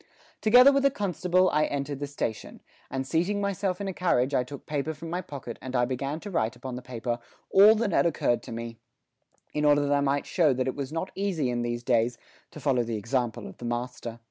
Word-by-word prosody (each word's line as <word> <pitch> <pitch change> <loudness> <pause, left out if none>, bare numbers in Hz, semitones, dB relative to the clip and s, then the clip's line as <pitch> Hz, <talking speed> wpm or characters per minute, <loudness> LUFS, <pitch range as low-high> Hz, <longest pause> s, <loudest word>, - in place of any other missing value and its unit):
Together 250 +5 +8
with 275 0 +2
the 275 - +5
constable 185 - +1
I 155 0 +3
entered 140 0 -3
the 145 - -3
station, 130 -6 -5 0.3
and 135 0 -3
seating 175 +8 0
myself 200 -2 -1
in 200 - -3
a 190 - -3
carriage 140 -7 +1
I 125 - +3
took 140 +2 -10
paper 150 +1 -2
from 165 +2 -8
my 180 +1 -1
pocket 140 -9 -8
and 130 0 -6
I 125 -1 +3
began 135 +4 -3
to 205 - -7
write 110 -10 0
upon 130 -2 -6
the 125 - -6
paper 120 -1 -4 0.3
all 205 +3 +8
that 220 -2 0
had 170 - +3
occurred 120 -6 +1
to - - -10
me, 115 0 -6 0.7
in 150 - -1
order 145 -1 +5
that 145 - +1
I 140 - +3
might 140 0 +1
show 155 -6 +3
that 130 0 -1
it 130 - -2
was 140 -1 -4
not 165 +3 -3
easy 180 -10 -1
in 120 0 -1
these 120 0 -3
days 120 -1 +2 0.3
to - - -11
follow 135 -4 +2
the 115 -1 -2
example 120 +1 -2
of - - -11
the 120 - -7
master. 120 -1 -4
140 Hz, 230 wpm, -27 LUFS, 125-180 Hz, 0.7 s, Together